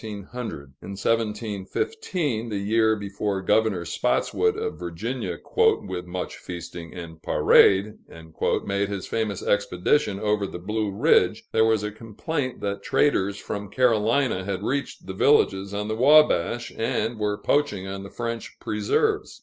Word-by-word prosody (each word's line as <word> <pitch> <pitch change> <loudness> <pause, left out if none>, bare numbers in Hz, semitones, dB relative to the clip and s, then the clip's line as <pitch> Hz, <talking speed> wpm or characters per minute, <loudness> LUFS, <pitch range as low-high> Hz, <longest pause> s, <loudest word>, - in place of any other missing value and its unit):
In 105 -3 -6
1715, 115 - -3
the 105 - -2
year 110 +2 +2
before 100 -1 -3
Governor 105 -4 +2
Spotswood 415 - 0
of 445 +1 -4
Virginia, 95 +2 -4 0.2
"with 90 0 +2
much 90 +1 -5
feasting 85 -1 -8
and 80 -2 -9
parade," 100 +5 +4 0.7
made 100 0 -1
his 100 -2 -4
famous 105 -4 -2
expedition 105 +3 +1
over 105 -1 0
the - - -7
Blue 105 +4 -2
Ridge, 100 - +3
there 110 0 +4
was 110 -2 +2
a 105 - -2
complaint 125 +6 -4
that 100 0 -3
traders 100 -9 +1
from 100 -1 -5
Carolina 115 -1 +2
had 95 -1 -3
reached 140 +1 -3
the 95 - -6
villages 100 -4 +3
on 105 +1 -3
the 110 - -2
Wabash, 125 - +4
and 115 0 -1
were 105 -1 0
poaching 145 -10 0
on 95 0 -5
the 100 - -9
French 115 0 -5
preserves. 105 -1 0
105 Hz, 135 wpm, -25 LUFS, 95-115 Hz, 0.7 s, parade